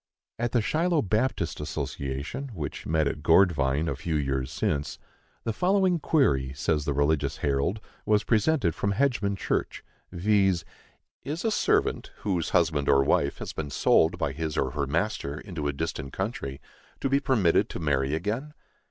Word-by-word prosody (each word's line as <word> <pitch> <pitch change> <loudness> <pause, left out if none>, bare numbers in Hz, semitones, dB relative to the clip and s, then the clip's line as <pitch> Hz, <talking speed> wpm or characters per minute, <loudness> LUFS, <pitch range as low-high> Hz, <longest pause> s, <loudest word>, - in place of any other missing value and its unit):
At 120 0 0
the 120 -3 +2
Shiloh 165 +5 +1
Baptist 110 +6 0
Association, 70 - -4
which 75 -4 -5
met 80 -1 +2
at 75 - -3
Gourdvine, 75 -3 +3
a - - -1
few 80 -2 -3
years 70 -3 -1
since, 70 0 -1 0.5
the 115 - -1
following 185 - +2
query, 70 - +2
says 75 +1 0
the 75 - 0
Religious 70 -1 +1
Herald, 70 +9 0 0.2
was 105 0 +2
presented 110 - +2
from 100 +4 -1
Hedgman 115 -5 +1
church, - - -2 0.3
viz: 95 -1 +2 0.6
Is 155 +7 -4
a 225 - +2
servant, - - +1
whose 90 -6 -1
husband 80 -5 +2
or 70 0 +5
wife 70 +1 +1
has - - -6
been 75 -2 -4
sold 70 - +3
by - - -1
his 80 -2 -4
or 65 - +1
her 70 +1 -2
master 80 -2 -1
into 85 -7 -5
a - - +1
distant 70 -2 -4
country, 95 - -4 0.4
to - - 0
be 135 +1 +3
permitted 120 - +2
to - - -6
marry 70 -2 +1
again? 115 - -3
85 Hz, 160 wpm, -27 LUFS, 70-110 Hz, 0.6 s, or